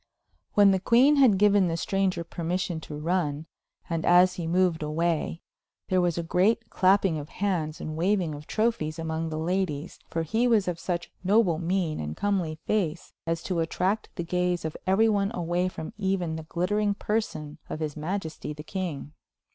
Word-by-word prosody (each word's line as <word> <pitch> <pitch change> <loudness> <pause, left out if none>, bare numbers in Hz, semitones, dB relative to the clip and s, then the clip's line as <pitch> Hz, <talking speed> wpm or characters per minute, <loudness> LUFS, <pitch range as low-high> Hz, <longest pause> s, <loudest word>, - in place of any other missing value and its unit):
When 205 -1 +7
the 190 - +2
queen 255 +9 +5
had 250 -8 +6
given 205 -1 +4
the 165 -1 -1
stranger 190 -1 0
permission 170 0 -3
to 150 -1 -8
run, 155 -2 -1 0.4
and 165 -1 -2
as 180 +1 +6
he 170 -2 -4
moved 175 -1 +2
away, 165 +2 -1 0.5
there 185 -1 +3
was 175 -2 +1
a 170 - -1
great 200 +7 +1
clapping 190 -3 +3
of 145 - -8
hands 175 -6 -2
and 155 - -5
waving 180 -1 +1
of 145 +1 -9
trophies 215 -9 0
among 160 0 -3
the 155 - -4
ladies, 170 -2 -2
for 165 - -1
he 225 +9 +1
was 220 -5 +3
of 175 -2 -2
such 175 -1 -3
noble 190 -4 +3
mien 175 -2 -1
and 75 0 -5
comely 190 -6 0
face 175 -6 -1
as 165 0 -1
to 180 -3 -1
attract 185 +6 0
the 175 - -3
gaze 180 0 0
of 160 - -3
every 200 +4 +4
one 200 -2 +2
away 175 +1 0
from 160 -3 -6
even 190 -4 0
the 160 - -5
glittering 205 +4 0
person 160 -9 -3
of - - -4
his 155 -2 -3
majesty 160 -1 -4
the 150 0 -9
king. 165 -6 -4
175 Hz, 180 wpm, -27 LUFS, 160-195 Hz, 0.5 s, When